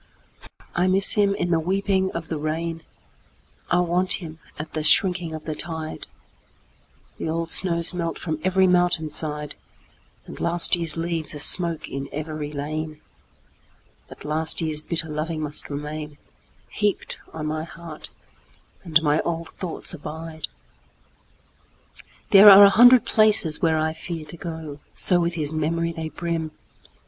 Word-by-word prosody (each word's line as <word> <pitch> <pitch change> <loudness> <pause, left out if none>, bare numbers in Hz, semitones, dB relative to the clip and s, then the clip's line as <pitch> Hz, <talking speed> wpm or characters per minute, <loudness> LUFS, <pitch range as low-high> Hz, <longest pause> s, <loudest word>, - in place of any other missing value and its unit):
I 180 +1 +1
miss 190 +1 +4
him 200 -2 +2
in 175 - -2
the 165 - +3
weeping 190 +2 0
of 165 -1 -5
the 160 - -4
rain;I 165 +2 -5
want 180 +2 +1
him 160 -3 -6 0.2
at 155 +1 -7
the 155 - -2
shrinking 175 +2 +2
of 155 - -9
the 155 - -3
tide; 160 0 -4 1.1
The - - -3
old 165 0 -1
snows 170 -1 +4
melt 170 -2 -3
from 155 -3 -4
every 190 0 +3
mountain 175 -4 +2
side, 150 -1 -2 0.7
And - - -10
last 170 +1 +2
year's 165 -2 -3
leaves 165 -2 -3
are - - -6
smoke 170 +1 +2
in 135 0 -6
every 155 0 -5
lane; 155 +1 -5 1.1
But - - -12
last 155 +2 -1
year's 155 -2 -2
bitter 165 0 -3
loving 155 +1 -4
must 150 -1 -2
remainHeaped 150 +7 -5
on 155 -1 -6
my 155 +1 -3
heart, 165 -1 -9 0.7
and 160 -1 +2
my 150 0 +2
old 165 -1 -4
thoughts 180 -1 -4
abide! 160 0 -7 1.8
There 205 +1 +10
are 200 0 +10
a 200 - +6
hundred 245 +2 +7
places 210 -8 +3
where 160 -1 +2
I 155 0 0
fearTo 160 -1 -8
go,—so 160 +2 0
with 170 0 -1
his 150 -3 -3
memory 165 +2 -1
they 160 -1 -5
brim! 165 -1 -3
165 Hz, 140 wpm, -23 LUFS, 155-175 Hz, 1.8 s, There